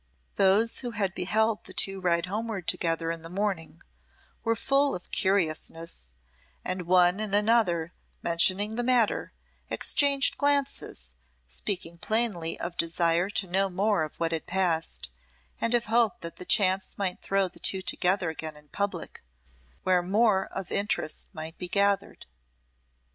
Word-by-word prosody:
Those 200 +4 +3
who 245 - -4
had 195 -3 0
beheld 215 +4 0
the - - -9
two 195 -1 0
ride 170 -1 +1
homeward 210 -1 -4
together 165 -1 0
in 165 -1 -5
the 165 - -10
morning, 190 -3 -3 0.6
were 230 0 +1
full 275 +5 +2
of 180 - -10
curiousness, 165 - -1 0.6
and 180 -1 -2
one 180 +1 +4
and 210 -2 -1
another, 205 -6 +2 0.3
mentioning 190 +6 +2
the - - +1
matter, 240 -3 +2 0.4
exchanged 280 -1 +3
glances, 280 - 0 0.4
speaking 170 - -4
plainly 215 -8 +1
of 175 - -5
desire 170 +2 +2
to 205 -1 0
know 195 +2 +1
more 195 +1 +1
of 155 -1 -4
what 165 0 -1
had 160 -2 -3
passed, 170 - 0 0.5
and 230 +1 +1
of 235 - +1
hope 225 -2 +2
that 170 +1 -7
chance 190 -1 +2
might 190 -3 -2
throw 195 -1 +1
the 180 - -12
two 190 -1 0
together 180 -2 +1
again 155 -1 -6
in 150 0 -19
public, 200 +4 -4 0.6
where 185 -1 +3
more 195 +1 +2
of 190 -1 -7
interest 200 -6 -1
might 160 +1 -8
be 180 - -2
gathered. 200 +2 +1
190 Hz, 145 wpm, -27 LUFS, 170-210 Hz, 0.6 s, one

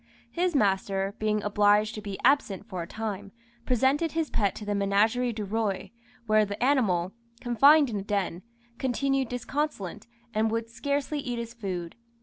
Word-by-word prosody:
His 355 -1 0
master, 195 -3 +1
being 215 -1 0
obliged 210 +1 +3
to 215 - -6
be 200 -2 -5
absent 235 -8 +2
for 185 -5 -5
a 170 - -6
time, 205 -2 -5 0.4
presented 270 +6 +2
his 320 -2 -1
pet 200 -3 +1
to 210 - -7
the 205 - -2
Ménagerie 215 +4 +2
du 215 -2 -3
Roi, 205 -2 -2 0.3
where 215 -1 +4
the 205 +2 -3
animal, 200 -10 +2 0.3
confined 280 +5 +5
in 220 -4 -3
a - - -2
den, 195 -4 -2 0.4
continued 270 0 0
disconsolate, 245 - -3 0.3
and 220 +1 +2
would 230 +1 -2
scarcely 285 +4 -2
eat 245 -3 -3
his 235 0 -5
food. 185 -7 -5
215 Hz, 160 wpm, -27 LUFS, 200-255 Hz, 0.4 s, confined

